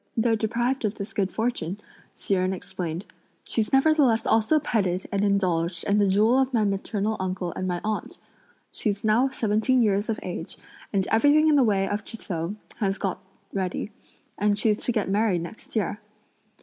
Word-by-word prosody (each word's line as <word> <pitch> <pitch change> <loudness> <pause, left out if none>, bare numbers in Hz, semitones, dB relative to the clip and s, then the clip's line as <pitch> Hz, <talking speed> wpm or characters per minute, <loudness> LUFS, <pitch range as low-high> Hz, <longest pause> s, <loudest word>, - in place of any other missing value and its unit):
"Though 230 0 +3
deprived 240 +4 -1
of 210 -1 -1
this 200 0 -7
good 195 -2 0
fortune," 220 -6 -2 0.4
Hsi - - -2
Jen 185 0 +1
explained, 180 -1 -5 0.4
"she's 220 -2 -1
nevertheless 270 -4 +4
also 225 +8 +3
petted 190 -9 -1
and 200 0 0
indulged 180 -4 0
and 205 +1 +3
the 200 - +4
jewel 215 +7 +4
of 265 0 +1
my 220 - +3
maternal 205 +1 -1
uncle 185 -2 -3
and 185 - -3
my 175 -1 -1
aunt! 215 0 -3 0.5
She's 205 -1 -2
now 225 +5 +3
seventeen 235 +1 +2
years 205 0 +1
of 220 - -1
age, 175 -2 -5 0.3
and 195 -2 +1
everything 290 +7 +5
in 300 - +5
the 275 - +5
way 195 -4 +2
of 205 +1 -2
trousseau 185 -5 -5 0.2
has 195 -4 0
been - - -15
got 185 +1 -7 0.3
ready, 190 +2 -2 0.5
and 205 0 +2
she's 210 0 +1
to - - +1
get 215 -4 0
married 195 -3 +1
next 195 +8 -11
year." 210 -1 -1
205 Hz, 175 wpm, -25 LUFS, 190-225 Hz, 0.5 s, everything